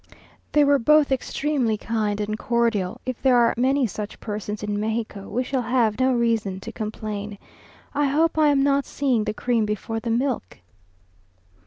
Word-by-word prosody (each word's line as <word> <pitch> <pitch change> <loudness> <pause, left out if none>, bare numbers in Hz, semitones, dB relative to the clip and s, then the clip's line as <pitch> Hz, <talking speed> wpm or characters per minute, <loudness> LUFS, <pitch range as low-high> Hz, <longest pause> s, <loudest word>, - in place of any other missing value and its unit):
They 295 - +5
were 285 -1 +4
both 300 +3 +4
extremely 265 -3 0
kind 210 -2 -2
and 210 0 -2
cordial; 230 -5 0
if 255 -2 -4
there 260 -2 +4
are 235 -1 +4
many 265 +2 +2
such 210 -1 -6
persons 210 0 -5
in 205 0 -2
Mexico, 220 -2 -3
we 250 +4 -1
shall 260 0 -1
have 235 -2 +1
no 260 0 +3
reason 230 -6 0
to 230 - -7
complain. 210 -2 -5 0.6
I 290 0 +1
hope 310 +4 +2
I 310 -1 +4
am 280 -2 +3
not 280 0 +2
seeing 255 -6 0
the 210 - -2
cream 235 -2 +1
before 210 +2 -3
the 230 - -5
milk! 240 - -1
230 Hz, 170 wpm, -23 LUFS, 210-265 Hz, 0.6 s, They